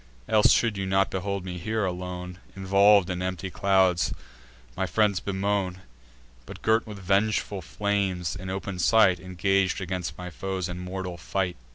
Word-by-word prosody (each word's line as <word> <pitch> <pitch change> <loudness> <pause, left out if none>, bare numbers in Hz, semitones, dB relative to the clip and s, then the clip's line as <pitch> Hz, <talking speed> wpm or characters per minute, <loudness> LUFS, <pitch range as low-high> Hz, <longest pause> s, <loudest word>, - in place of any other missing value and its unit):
Else 110 -1 +5
should 115 -4 +2
you 95 -1 -2
not 95 0 +2
behold 100 0 -3
me 90 -1 -5
here, 110 +3 -1
alone, 90 0 -5 0.2
Involv'd 100 0 +4
in 90 0 -3
empty 95 0 -3
clouds, 95 -3 +2 0.6
my 95 0 -1
friends 105 -2 +2
bemoan, 95 -1 -2 0.7
But, - - -10
girt 110 +1 +2
with 105 -2 -7
vengeful 100 +1 0
flames, 95 -1 -1
in 95 +1 -7
open 95 0 -4
sight 95 -1 +4
Engag'd 95 +2 0
against 90 -1 -4
my 90 0 -7
foes 95 +2 -3
in 90 -1 -6
mortal 90 -1 -5
fight. 90 0 -2
95 Hz, 155 wpm, -26 LUFS, 90-100 Hz, 0.7 s, Else